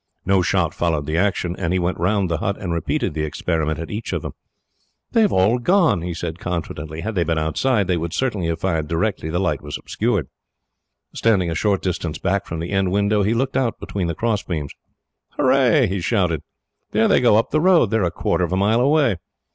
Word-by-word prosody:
No 95 Hz, 0 st, +3 dB
shot 85 Hz, -2 st, +1 dB
followed 80 Hz, -4 st, -1 dB
the 75 Hz, +2 st, -2 dB
action, 90 Hz, -1 st, 0 dB
and 85 Hz, -3 st, -1 dB
he 95 Hz, -, +2 dB
went 90 Hz, -1 st, -1 dB
round 95 Hz, +2 st, +1 dB
the 85 Hz, -1 st, -1 dB
hut, 100 Hz, +4 st, -1 dB
and 90 Hz, -3 st, -3 dB
repeated 80 Hz, -3 st, -1 dB
the 80 Hz, -, -3 dB
experiment 80 Hz, 0 st, -1 dB
at 80 Hz, -, -6 dB
each 110 Hz, +2 st, -4 dB
of -, -, -2 dB
them. -, -, -5 dB, 0.8 s
"They 230 Hz, -, +3 dB
have 210 Hz, -, +3 dB
all 105 Hz, +7 st, +3 dB
gone," 175 Hz, -, +3 dB
he 85 Hz, 0 st, -4 dB
said 85 Hz, 0 st, -5 dB
confidently. 80 Hz, -2 st, -4 dB
"Had 110 Hz, +6 st, -3 dB
they 90 Hz, -4 st, +1 dB
been 85 Hz, 0 st, -1 dB
outside, 100 Hz, +8 st, +1 dB
they 90 Hz, -1 st, 0 dB
would 85 Hz, 0 st, -3 dB
certainly 105 Hz, -9 st, -1 dB
have 85 Hz, -1 st, -2 dB
fired 80 Hz, -5 st, -1 dB
directly 85 Hz, +1 st, -1 dB
the 85 Hz, -, -1 dB
light 90 Hz, -7 st, 0 dB
was 75 Hz, -1 st, -5 dB
obscured." -, -, -1 dB, 0.9 s
Standing 95 Hz, -7 st, +2 dB
a -, -, -1 dB
short 100 Hz, +2 st, +1 dB
distance 85 Hz, -4 st, -2 dB
back 100 Hz, +2 st, -1 dB
from 80 Hz, -, -4 dB
the 85 Hz, +3 st, -4 dB
end 95 Hz, -2 st, +1 dB
window, 100 Hz, +1 st, +2 dB
he 105 Hz, +4 st, +1 dB
looked 130 Hz, +3 st, -1 dB
out 130 Hz, -4 st, 0 dB
between 95 Hz, -4 st, -3 dB
the 85 Hz, -, -3 dB
crossbeams. 95 Hz, -10 st, -2 dB, 0.6 s
"Hurrah!" 130 Hz, +1 st, +4 dB
he 95 Hz, -2 st, -2 dB
shouted. 90 Hz, -7 st, 0 dB, 0.5 s
"There 110 Hz, +1 st, +3 dB
they -, -, +4 dB
go 120 Hz, -4 st, +5 dB
up 115 Hz, +3 st, +1 dB
the 155 Hz, -, +2 dB
road. 175 Hz, -, +4 dB
They 110 Hz, -, +3 dB
are 105 Hz, -, +1 dB
a 85 Hz, -, +2 dB
quarter 85 Hz, 0 st, -1 dB
of 85 Hz, -, -1 dB
a 95 Hz, -, +1 dB
mile 105 Hz, +5 st, +3 dB
away. 140 Hz, -, +3 dB
95 Hz, 220 wpm, -21 LUFS, 85-110 Hz, 0.9 s, go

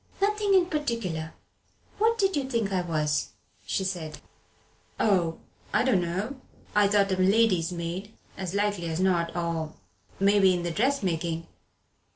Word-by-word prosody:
"Nothing 410 Hz, 0 st, +2 dB
in 370 Hz, -2 st, +5 dB
particular. 230 Hz, -, -3 dB, 0.6 s
What 450 Hz, +2 st, +3 dB
did 390 Hz, -4 st, +2 dB
you 275 Hz, -2 st, -1 dB
think 230 Hz, -6 st, 0 dB
I 185 Hz, -, +2 dB
was?" 150 Hz, -4 st, -1 dB, 0.3 s
she 190 Hz, -, 0 dB
said. 175 Hz, -5 st, -4 dB, 0.8 s
"Oh 175 Hz, -6 st, +2 dB, 0.4 s
I -, -, +4 dB
dunno 205 Hz, +3 st, 0 dB, 0.3 s
I 205 Hz, -1 st, +5 dB
thought 200 Hz, -1 st, +3 dB
a 190 Hz, -, +1 dB
lady's 185 Hz, -3 st, +3 dB
maid, 175 Hz, +4 st, -4 dB, 0.2 s
as 190 Hz, -1 st, -4 dB
likely 200 Hz, -4 st, 0 dB
as 160 Hz, +1 st, -2 dB
not, 175 Hz, -3 st, +1 dB
or 165 Hz, -2 st, -2 dB, 0.4 s
maybe 195 Hz, -1 st, +5 dB
in 175 Hz, -, -3 dB
the 175 Hz, -, -1 dB
dressmaking. 170 Hz, -, 0 dB
190 Hz, 140 wpm, -27 LUFS, 170-230 Hz, 0.8 s, in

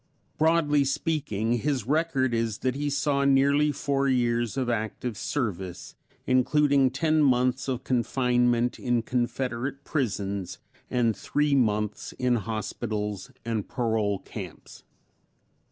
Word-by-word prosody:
Broadly 155 Hz, -2 st, +3 dB
speaking, 135 Hz, -, -1 dB
his 135 Hz, -4 st, -1 dB
record 140 Hz, -3 st, +1 dB
is 115 Hz, -2 st, 0 dB
that 130 Hz, -, +2 dB
he 145 Hz, +2 st, -2 dB
saw 140 Hz, 0 st, +1 dB
nearly 140 Hz, +2 st, +4 dB
four 140 Hz, 0 st, 0 dB
years 120 Hz, -2 st, +1 dB
of 130 Hz, -2 st, 0 dB
active 115 Hz, 0 st, -2 dB
service, 95 Hz, -8 st, -4 dB, 0.3 s
including 135 Hz, +1 st, +3 dB
ten 155 Hz, +4 st, +1 dB
months 130 Hz, -1 st, +2 dB
of 130 Hz, -1 st, -2 dB
confinement 125 Hz, -1 st, +1 dB
in 120 Hz, -2 st, 0 dB
Confederate 125 Hz, +2 st, -2 dB
prisons 100 Hz, -, -2 dB, 0.3 s
and 120 Hz, -3 st, +1 dB
three 145 Hz, 0 st, 0 dB
months 105 Hz, -5 st, 0 dB
in 125 Hz, -1 st, +1 dB
hospitals 105 Hz, 0 st, -4 dB, 0.2 s
and 115 Hz, -3 st, -2 dB
parole 110 Hz, -5 st, 0 dB
camps. -, -, -10 dB
125 Hz, 115 wpm, -27 LUFS, 115-140 Hz, 0.3 s, nearly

